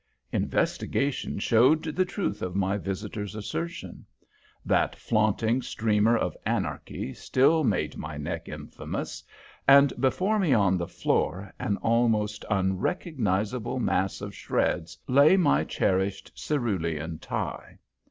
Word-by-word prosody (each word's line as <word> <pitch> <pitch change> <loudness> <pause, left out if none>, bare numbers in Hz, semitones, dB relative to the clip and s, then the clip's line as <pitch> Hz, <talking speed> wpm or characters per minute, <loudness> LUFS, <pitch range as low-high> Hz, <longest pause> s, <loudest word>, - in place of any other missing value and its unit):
Investigation 140 0 -1
showed 120 +9 +4
the 165 +4 0
truth 180 - -3
of 90 0 -4
my 95 0 +1
visitor's 100 +1 -4
assertion. 115 +11 -5 0.6
That - - +2
flaunting 110 +3 +1
streamer 110 0 +2
of - - -2
anarchy 65 - -3
still 155 +5 +2
made 105 -9 0
my 75 -1 -6
neck 75 0 -5
infamous, - - -6 0.4
and 140 0 +7
before 185 +11 +2
me 170 -9 +3
on 100 -4 +3
the 85 - -3
floor, 95 +5 -1
an 100 - -1
almost 110 -3 +1
unrecognizable 105 - -1
mass 95 -6 0
of 100 0 -6
shreds, 80 - -1
lay 140 +8 +6
my 175 -6 +3
cherished 95 +1 -1
cerulean 85 - -2
tie. - - -5
110 Hz, 115 wpm, -27 LUFS, 95-135 Hz, 0.6 s, and